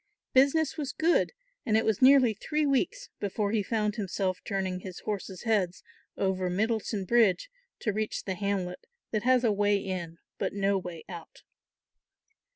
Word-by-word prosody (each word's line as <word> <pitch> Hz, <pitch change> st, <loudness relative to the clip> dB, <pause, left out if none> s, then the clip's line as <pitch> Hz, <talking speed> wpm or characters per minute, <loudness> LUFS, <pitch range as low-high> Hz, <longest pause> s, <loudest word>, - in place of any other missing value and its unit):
Business 280 Hz, +4 st, +3 dB
was 285 Hz, -3 st, -3 dB
good 335 Hz, +2 st, +2 dB, 0.3 s
and 220 Hz, -6 st, +2 dB
it 220 Hz, -, +1 dB
was 220 Hz, -3 st, +1 dB
nearly 260 Hz, -3 st, +7 dB
three 300 Hz, +8 st, -1 dB
weeks 365 Hz, -, 0 dB
before 205 Hz, 0 st, -1 dB
he 220 Hz, -1 st, +2 dB
found 210 Hz, 0 st, -1 dB
himself 190 Hz, -2 st, -1 dB
turning 190 Hz, -2 st, -2 dB
his 185 Hz, -1 st, -8 dB
horses' 195 Hz, -3 st, -4 dB
heads 200 Hz, -6 st, 0 dB, 0.3 s
over 190 Hz, -1 st, 0 dB
Middleton 215 Hz, +1 st, -1 dB
bridge 235 Hz, -, +3 dB, 0.3 s
to 210 Hz, -, 0 dB
reach 215 Hz, +1 st, -2 dB
the 190 Hz, -, -2 dB
hamlet 185 Hz, -2 st, -3 dB, 0.2 s
that 215 Hz, -, 0 dB
has 255 Hz, +1 st, +3 dB
a 230 Hz, -, +4 dB
way 205 Hz, 0 st, +2 dB
in 180 Hz, -4 st, -4 dB, 0.2 s
but -, -, -1 dB
no 200 Hz, 0 st, +2 dB
way 180 Hz, -4 st, -5 dB
out. 170 Hz, -3 st, -10 dB
205 Hz, 160 wpm, -29 LUFS, 190-240 Hz, 0.3 s, nearly